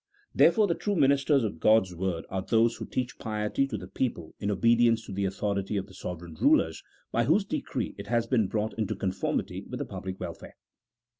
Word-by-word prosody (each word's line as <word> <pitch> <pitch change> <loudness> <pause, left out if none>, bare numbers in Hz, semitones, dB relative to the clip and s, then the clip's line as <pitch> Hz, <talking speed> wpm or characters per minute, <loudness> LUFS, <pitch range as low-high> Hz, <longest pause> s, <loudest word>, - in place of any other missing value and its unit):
Therefore 215 -2 +5
the 175 - +1
true 205 +4 -2
ministers 140 -2 +3
of 100 -7 -3
G - - +1
od's 110 -4 +5
word 90 -1 -2
are 95 - -3
those 115 +3 +2
who - - -6
teach 125 -1 -3
piety 110 +4 -1
to 110 - -4
the 90 -2 -8
people 95 -5 -3
in 100 - -2
obedience 115 +3 +3
to - - -9
the 100 +1 -1
authority 100 +1 -1
of 95 - -2
the - - -16
sovereign 85 -2 -7
rulers 80 - +2 0.3
by 115 0 +2
whose 185 - +3
decree - - -3
it - - -7
has 120 -1 +1
been 115 -4 +2
brought 110 +2 -2
into 105 -3 -1
conformity 95 -1 -2
with - - -4
the - - -3
public 95 0 -6
welfare. 85 -2 -7
105 Hz, 205 wpm, -28 LUFS, 95-120 Hz, 0.3 s, Therefore